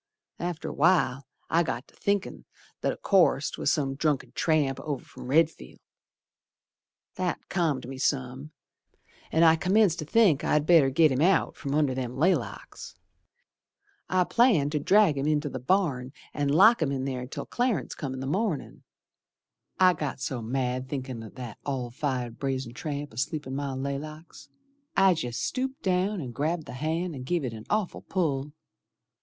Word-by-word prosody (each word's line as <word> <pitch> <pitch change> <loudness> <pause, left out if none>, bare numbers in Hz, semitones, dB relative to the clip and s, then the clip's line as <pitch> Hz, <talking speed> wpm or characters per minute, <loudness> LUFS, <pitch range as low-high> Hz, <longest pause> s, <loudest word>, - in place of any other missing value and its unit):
After 175 -2 -4
a - - -5
while 145 -5 +2 0.2
I 165 - +3
got 130 -5 -3
to - - -23
thinkin' 200 -1 -2 0.4
that - - +1
o' - - -7
course 175 -7 +3
'Twas - - 0
some 135 -3 0
drunken 145 0 -1
tramp 150 -5 +1
over 145 -4 -4
from - - -11
Redfield. 155 - +1 1.4
That 185 -1 -2
calmed 155 -9 0
me 135 0 -7
some, 135 +1 -1 0.8
An' 160 - +3
I 160 -1 +7
commenced 185 +1 +2
to 155 - -4
think 180 -4 +4
I'd 150 -1 +2
better 160 -5 +6
git 155 +2 +4
him 130 +2 0
out 185 +4 +3
From 140 -1 -3
under 150 -3 +2
them 125 -1 -4
laylocks. 180 +7 -1 1.1
I 185 0 +3
planned 185 - +3
to 150 - 0
drag 185 -2 +4
him 140 - -1
in 155 -1 +3
t' 145 0 -4
th' 130 -1 -8
barn 140 -10 +1 0.2
An' 145 -1 -1
lock 195 +9 +6
him 145 -3 +1
in 135 -1 -2
ther 125 -2 -3
till - - -6
Clarence 235 - -1
come 135 -2 -5
in 130 - -6
th' 135 - -4
mornin'. 185 -1 -2 1.0
I 185 -1 +6
got 150 -5 -4
so 130 -2 -3
mad 125 +2 -2
thinkin' 130 -4 -4
o' 110 - -9
that 120 -3 -9
all 130 -4 -3
fired 125 -3 -3
brazen 130 -3 -3
tramp 145 -1 -5
Asleep 145 +6 -3
in 130 - -6
my 140 -1 -3
laylocks, 150 +4 -6 0.5
I 195 -1 +6
jest 125 -8 -3
stooped 265 +1 -3
down 190 +2 +1
and 125 -4 -6
grabbed 155 +5 -1
th' - - -13
hand 165 +4 -2
and 130 -3 -7
give 165 +2 -1
it 120 - -4
an 110 -1 -9
awful 210 -3 -1
pull. 150 -6 -1
145 Hz, 170 wpm, -27 LUFS, 130-175 Hz, 1.4 s, I